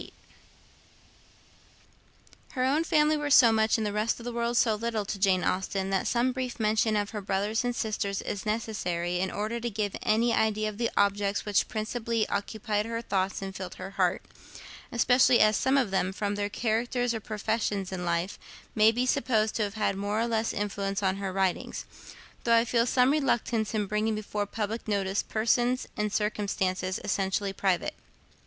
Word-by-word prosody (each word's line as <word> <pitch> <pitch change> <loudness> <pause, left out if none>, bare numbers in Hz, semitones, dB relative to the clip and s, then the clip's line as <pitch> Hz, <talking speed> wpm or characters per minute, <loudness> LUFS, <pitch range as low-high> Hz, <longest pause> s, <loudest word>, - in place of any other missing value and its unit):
Her 255 - 0
own 285 +5 +2
family 305 -1 +3
were 295 -1 -2
so 245 -5 +7
much, 220 0 +3
and 220 - -1
the 205 - -2
rest 215 +3 0
of - - -9
the 245 - -4
world 235 0 -1
so 225 -2 +4
little, 220 -1 -2
to 200 - -4
Jane 190 -2 +3
Austen, 190 +1 -1
that 195 - 0
some 245 +2 +2
brief 255 -1 -4
mention 215 0 +2
of 205 -1 -1
her 210 -2 -4
brothers 200 +4 -1
and 245 0 -1
sister 215 -2 -1
is 200 0 -4
necessary 180 -6 -2
in 190 +1 0
order 215 +4 -3
to 240 +1 -2
give 210 -2 -2
any 230 +2 +2
idea 215 -1 +1
of 210 +1 -10
the 235 - +1
objects 200 0 +1
which 205 -2 +2
principally 225 0 -2
occupied 210 +1 -2
her 230 0 -3
thoughts 195 -1 -1
and 195 0 -6
filled 185 -1 -6
her 190 +1 -7
heart, 185 -2 0 0.7
especially 250 +1 +4
as 215 0 +5
some 265 +5 +2
of 245 -8 +1
them, 190 -1 +1
from 205 +1 -2
their 205 0 -2
characters 240 +3 0
or 225 - -3
professions 210 -2 -2
in 185 -1 -4
life, 170 +2 -1 0.3
may 220 +1 +5
be 245 +2 0
supposed 220 -4 +1
to - - -2
have 205 0 -2
had 215 -2 0
more 205 +2 -1
or 230 - +1
less 225 -1 0
influence 200 0 -2
on 190 0 +1
her 195 -1 -3
writings: 190 -1 -1 0.6
though 230 -1 +4
I 230 +1 +4
feel 235 0 +2
some 250 +2 +4
reluctance 235 -6 0
in 210 -1 +1
bringing 215 +2 0
before 210 -1 -3
public 220 +2 -4
notice 200 -1 0
persons 240 +3 +1
and 210 0 -1
circumstances 195 -3 -1
essentially 195 0 -1
private. 190 -3 0
215 Hz, 180 wpm, -28 LUFS, 195-230 Hz, 0.7 s, so